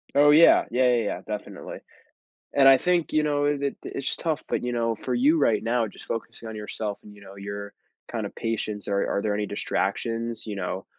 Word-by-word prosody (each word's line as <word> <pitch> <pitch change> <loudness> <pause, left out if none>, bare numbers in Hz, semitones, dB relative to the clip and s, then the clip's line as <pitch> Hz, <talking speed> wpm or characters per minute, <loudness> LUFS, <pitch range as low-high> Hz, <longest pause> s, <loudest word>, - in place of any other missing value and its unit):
Oh, 145 +1 +7
yeah. 160 +3 +7
Yeah, 125 +1 +3
yeah, 115 - +1
yeah, 105 - -3
definitely. 105 -1 -6 0.7
And 135 -1 +7
I 135 - +8
think, 175 -2 +1
you 155 0 +2
know, 145 -1 +1
it 145 -1 0
it 140 - -1
it's 140 - -3
tough, 160 -2 -2
but - - -1
you 125 - -1
know, 115 -1 0
for 125 +4 -4
you 145 +7 +4
right 115 -6 +3
now, 115 -1 +1
just - - -12
focusing 115 0 -5
on 110 - -6
yourself 105 -1 -4
and, 105 - -13
you 100 - -16
know, 100 0 -12
your 100 +1 -7 0.4
kind - - -3
of - - -8
patience, 110 -2 -3
are 100 0 +1
are - - 0
there 105 -1 0
any 105 0 -1
distractions, 115 +3 -2
you 105 -2 -5
know, 95 0 -4
115 Hz, 220 wpm, -25 LUFS, 105-140 Hz, 0.7 s, I